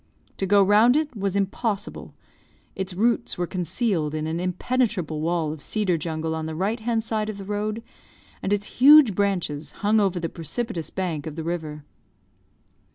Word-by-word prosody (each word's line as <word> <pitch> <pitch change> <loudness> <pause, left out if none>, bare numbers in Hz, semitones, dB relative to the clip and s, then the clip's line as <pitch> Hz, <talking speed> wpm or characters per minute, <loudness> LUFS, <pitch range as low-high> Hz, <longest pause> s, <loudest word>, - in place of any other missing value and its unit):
To 195 - -1
go 200 +1 +5
round 215 +6 +5
it 300 -4 0
was 200 -2 -2
impossible; 200 +2 -2 0.6
its 190 -1 -4
roots 230 +4 +1
were 175 - 0
concealed 180 -3 -1
in 155 0 -2
an 160 +2 -2
impenetrable 180 - -1
wall 165 -2 0
of 155 - -10
cedar 205 -2 0
jungle 160 0 -3
on 160 0 -3
the 160 - -5
right 200 +7 -1
hand 225 0 -1
side 215 -1 -2
of 215 - -5
the 195 - -8
road, 210 +2 -3 0.6
and 195 - -2
its 205 0 +1
huge 280 -3 +8
branches 175 -7 -1
hung 215 +1 +4
over 190 -3 +1
the 165 - -2
precipitous 165 - -4
bank 165 -6 -3
of 155 - -6
the 160 - -4
river. 155 -3 -4
190 Hz, 170 wpm, -24 LUFS, 160-215 Hz, 0.6 s, huge